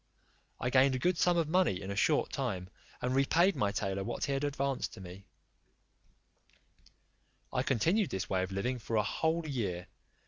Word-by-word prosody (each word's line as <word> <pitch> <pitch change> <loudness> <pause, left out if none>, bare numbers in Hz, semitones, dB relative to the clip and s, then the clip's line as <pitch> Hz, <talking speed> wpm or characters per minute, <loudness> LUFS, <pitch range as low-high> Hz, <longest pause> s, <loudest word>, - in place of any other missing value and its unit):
I 125 - -1
gained 130 +1 +5
a - - +1
good 175 +6 +1
sum 175 -1 +3
of 165 -2 +1
money 165 - +2
in 100 0 -6
a - - -3
short 145 +8 +2
time, 95 -10 -3 0.3
and 125 +1 0
repaid 165 +8 +3
my 100 -1 +1
tailor 100 -1 -2
what - - -4
he - - -2
had 135 +1 -1
advanced 140 -2 -1
to - - -11
me 95 +1 -10 2.3
I 125 - +1
continued 165 - +2
this 95 - -3
way 95 -1 0
of 95 +1 -3
living 120 +7 -2
for 115 0 -4
a 105 - +3
whole 160 +6 0
year. 100 -11 -2
125 Hz, 180 wpm, -32 LUFS, 100-150 Hz, 2.3 s, gained